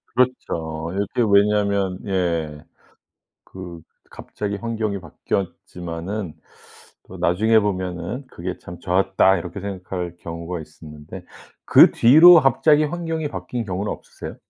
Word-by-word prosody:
그렇죠. 85 -10 -1
이게 100 +4 -1
왜냐하면 100 -2 +2
예. 85 -6 -2 0.8
그 90 -3 -10 0.3
갑자기 100 -1 -5
환경이 110 -2 -3
바뀌었지만은 90 +1 -5 0.7
또 - - -10
나중에 110 +6 +3
보면은 95 +5 -4
'그게 - - -6
참 85 0 -11
좋았다.' 95 +1 +2
이렇게 90 +3 -7
생각할 90 -3 -6
경우가 85 +1 -6
있었는데, 75 +3 -12 0.4
그 - - +7
뒤로 160 +8 +8
갑자기 150 +2 +3
환경이 160 -1 -3
바뀐 125 -4 -5
경우는 100 +1 -3
없으세요? - - -10
95 Hz, 275 characters per minute, -21 LUFS, 85-110 Hz, 0.8 s, 뒤로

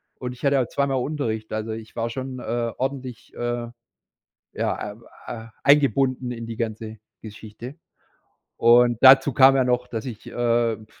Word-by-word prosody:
und 125 -1 -6
ich 125 +3 -8
hatte 140 -1 +3
auch 120 - -2
2 140 0 -1
Mal 135 - -1
Unterricht. 125 -5 -3
Also, 110 +1 -3
ich 110 0 -10
war 115 0 -2
schon, 130 +1 -6
äh, 115 0 -2
ordentlich, 130 -3 -5
äh, 120 0 -3 0.9
ja, 105 - -3
äh 105 - -12 0.4
äh, 115 -1 -9 0.2
eingebunden 135 -3 +3
in 115 -1 -6
die 115 -1 -7
ganze 110 -1 -5 0.2
Geschichte. 110 +4 -10 0.8
Und 120 0 +5
dazu 135 +1 +7
kam 135 +2 +6
ja 130 - +3
noch, 125 0 0
dass 115 -2 -5
ich, 115 -5 -8
äh, 120 -2 0
puh, 110 - -15
120 Hz, 170 wpm, -23 LUFS, 115-130 Hz, 0.9 s, dazu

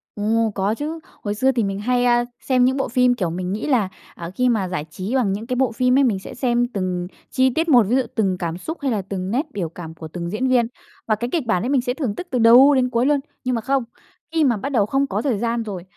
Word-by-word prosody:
Ồ! 220 +2 +1
Có 200 +2 0
chứ. 310 +5 -4 0.2
Hồi 205 -1 -2
xưa 260 +5 +3
thì 240 -3 0
mình 195 -1 -2
hay, 245 +3 +1
a, 240 0 +3 0.2
xem 255 -2 +2
những 260 +2 +1
bộ 270 - 0
phim, 250 +1 +3
kiểu, 195 -8 -2
mình 180 +2 -4
nghĩ 215 - -3
là, 235 -9 +2 0.3
à, 170 -1 -7
khi 250 0 +2
mà 215 -6 +1
giải 175 -4 -3
trí 190 +10 -4
bằng 225 -7 +2
những 215 +3 -5
cái 250 - -1
bộ 255 -1 +1
phim 250 +2 +2
ấy, 280 - +5
mình 220 -7 +1
sẽ - - -9
xem 245 -1 +1
từng 180 -2 -2 0.2
chi 260 0 +3
tiết 325 +6 -1
một. 245 -6 +7
Ví 245 - +3
dụ 265 - +4
từng 195 -4 +1
cảm 170 -1 -3
xúc, 320 - -6
hay 275 -2 0
là 210 -3 0
từng 190 0 -5
nét 265 +7 0
biểu 175 -5 -3
cảm 165 -1 -9
của 160 -1 -9
từng 170 +2 -5
diễn 215 +7 -1
viên. 245 -3 +3 0.4
Và 215 - +3
cái 240 +3 -4
kịch 325 -7 0
bản 185 -5 +1
ấy 245 - -2
mình 275 -2 +2
sẽ 245 0 -2
thưởng 255 -8 -3
tức 360 - -6
từ 250 - 0
đầu 245 +5 +7
đến 255 -1 +2
cuối 235 0 +1
luôn. 290 0 +3 0.2
Nhưng 255 -2 0
mà 230 - -2
không. 270 +2 0 0.5
Khi 325 -1 +3
mà 245 -6 +3
bắt 240 +8 -4
đầu 235 -8 +2
không 275 +6 0
có - - -2
thời 260 -7 0
gian 230 +2 -1
rồi, 195 -5 -6
235 Hz, 285 wpm, -21 LUFS, 195-260 Hz, 0.5 s, một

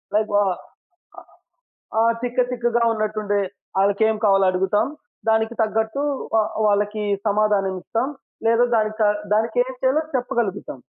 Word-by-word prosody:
Like 215 0 +1
వ 205 - +5 0.8
ఆహ్, - - -20 0.7
ఆ! 225 - +5 0.2
తిక్క 245 +1 +1
తిక్కగా 240 -1 0
ఉన్నట్టుండే. 215 -2 -1 0.4
ఆళ్ళకేం 215 +2 +2
కావాలో 195 -1 +4
అడుగుతాం. 200 +5 +1 0.4
దానికి 220 +1 +2
తగ్గట్టు 220 +5 -1 0.4
ఆహ్, 215 0 0 0.2
వాళ్ళకి 210 +1 0 0.2
సమాధానం 205 -2 +1
ఇస్తాం. 240 +8 -1 0.4
లేదా 230 +1 +4
దాని 215 -1 +1
క - - +5 0.3
దానికేం 230 +4 +1
చేయాలో 265 +4 +2
చెప్పగలుగుతాం. 235 - -2
220 Hz, 120 wpm, -22 LUFS, 205-235 Hz, 0.8 s, వ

